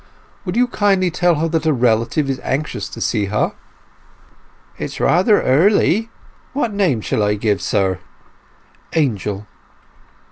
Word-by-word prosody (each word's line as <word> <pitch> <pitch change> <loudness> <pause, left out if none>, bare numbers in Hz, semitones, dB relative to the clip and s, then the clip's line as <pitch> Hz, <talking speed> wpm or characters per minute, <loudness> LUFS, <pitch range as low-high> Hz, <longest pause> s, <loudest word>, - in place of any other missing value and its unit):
"Will 180 +3 -3
you 250 - +5
kindly 195 -6 +1
tell 175 +1 +2
her 160 +2 0
that 160 -1 -1
a 155 - +4
relative 120 +3 +1
is 135 -1 -2
anxious 145 +3 -3
to - - -9
see 105 -3 0
her?" 105 +2 0 1.3
"It - - -2
is - - -7
rather 190 +5 +3
early. 200 - +3 0.4
What 240 -6 -1
name 180 - +1
shall 105 - -1
I 105 0 +2
give, 105 -1 0
sir?" 95 -3 0 1.0
"Angel." 105 - -1
150 Hz, 140 wpm, -19 LUFS, -, 1.3 s, you